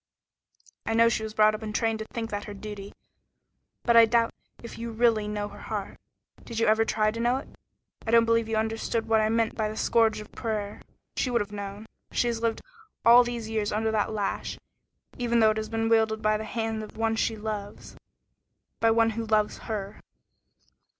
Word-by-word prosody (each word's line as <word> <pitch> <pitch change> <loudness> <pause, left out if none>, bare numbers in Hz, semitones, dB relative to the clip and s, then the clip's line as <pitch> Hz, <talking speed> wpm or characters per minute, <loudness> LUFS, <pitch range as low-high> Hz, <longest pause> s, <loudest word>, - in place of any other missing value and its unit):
"I 225 - -1
know 230 0 +6
she 220 - -1
was 220 0 -6
brought 215 0 +5
up 215 - -5
and 215 -1 -5
trained 225 -1 +1
to 220 - -4
think 225 0 -5
that 205 0 -3
her 205 - -7
duty, 205 -1 -8 0.9
but 235 - +3
I 230 0 +9
doubt 230 0 +2 0.3
if 235 - -9
you 235 0 -4
really 225 -2 +2
know 210 -1 -3
her 205 0 -12
heart. 205 -3 -5 0.4
Did 230 - -8
you 230 - +2
ever 220 +1 +4
try 215 -1 +1
to 230 - -6
know 240 +2 +2
it? - - -7 0.6
I - - -1
don't 230 0 +5
believe 230 -1 +2
you 225 - 0
understood 225 +1 -1
what 220 -1 +3
I 215 - +2
meant 225 0 +1
by 215 -1 -1
the 215 - -7
scourge 225 -2 +2
of 210 - -10
prayer. 210 -3 -4 0.3
She 255 - 0
would 240 -1 +2
have 205 0 -5
known. 205 +1 -6 0.3
She - - +1
has 235 -1 -1
lived 230 -1 -1 0.4
all 240 +2 +9
these 240 -2 -4
years 215 -2 -1
under 220 +1 0
that 220 0 0
lash, 205 -2 -3 0.6
even 235 -1 +2
though 220 -1 +6
it 215 - -3
has 215 0 -3
been 225 0 -1
wielded 220 -1 +3
by 215 0 +3
the 215 +1 -3
hand 225 -1 -2
of 215 - -10
one 225 0 +1
she 225 0 0
loves 210 -1 -6 0.8
by 225 - +4
one 225 0 +3
who 225 0 -4
loves 215 -1 +1
her." 205 -1 -4
220 Hz, 210 wpm, -27 LUFS, 215-230 Hz, 0.9 s, I